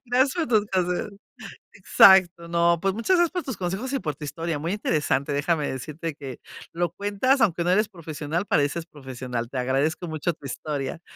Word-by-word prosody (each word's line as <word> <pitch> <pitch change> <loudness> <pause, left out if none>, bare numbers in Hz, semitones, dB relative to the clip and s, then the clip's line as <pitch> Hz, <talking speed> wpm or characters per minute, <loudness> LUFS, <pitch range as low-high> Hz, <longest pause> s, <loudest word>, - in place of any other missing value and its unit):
Gracias 260 +3 +2
por 335 - -1
tus 215 -3 +3
consejos. 185 +1 -1 0.6
Exacto, 185 -3 +5
no, 170 0 +2
pues 195 -1 +1
muchas 230 - +1
gracias 345 -2 +3
por 360 -3 -3
tus 260 -5 -4
consejos 190 +8 -3
y 270 - 0
por 155 - -3
tu 150 - -11
historia, 165 +2 -3
muy 165 +4 -3
interesante, 150 -7 0
déjame 150 +1 0
decirte 155 +4 -5
que, 135 -4 -8 0.3
lo 175 -1 -1
cuentas, 205 +8 +1
aunque 175 -6 +2
no 175 - +1
eres 210 +3 +3
profesional, 165 -1 -4
pareces 150 +2 0
profesional. 130 -5 -6
Te 130 - -6
agradezco 135 +7 0
mucho 160 +2 -1
tu 145 - -16
historia. 145 +3 -4
170 Hz, 185 wpm, -25 LUFS, 145-200 Hz, 0.6 s, Exacto